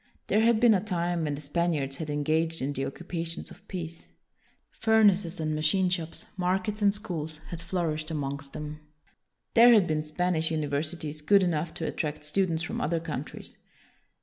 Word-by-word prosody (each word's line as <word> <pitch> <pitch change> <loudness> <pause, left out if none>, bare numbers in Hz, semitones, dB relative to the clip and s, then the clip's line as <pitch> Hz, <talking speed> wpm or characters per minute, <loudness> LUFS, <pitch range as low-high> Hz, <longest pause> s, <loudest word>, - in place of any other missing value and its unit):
There 215 - +3
had 230 -1 +4
been 240 -1 +6
a 190 -2 +1
time 175 -4 -1
when 145 -1 -1
the 145 - -7
Spaniards 145 -3 -1
had 155 -1 -5
engaged 160 +3 0
in 140 +2 -1
the 135 0 -2
occupations 165 +2 -5
of 200 +1 -15
peace. 170 -3 -6 0.6
Furnaces 205 -5 +3
and 155 -1 -1
machine 155 +5 +2
shops, 165 -3 -2
markets 190 +3 0
and 200 -1 +5
schools, 165 -7 -5
had 170 -1 -5
flourished 165 -3 -2
amongst 140 -2 -4
them. 150 0 -6 0.7
There 235 0 +8
had 205 -5 +5
been 155 -2 0
Spanish 160 +1 0
universities 155 0 -2
good 200 +5 +5
enough 165 -2 0
to 165 - -3
at - - -4
tract 150 -1 -3
students 165 0 +1
from - - -3
other 165 +2 0
countries. 160 -1 -6
165 Hz, 170 wpm, -28 LUFS, 155-185 Hz, 0.7 s, There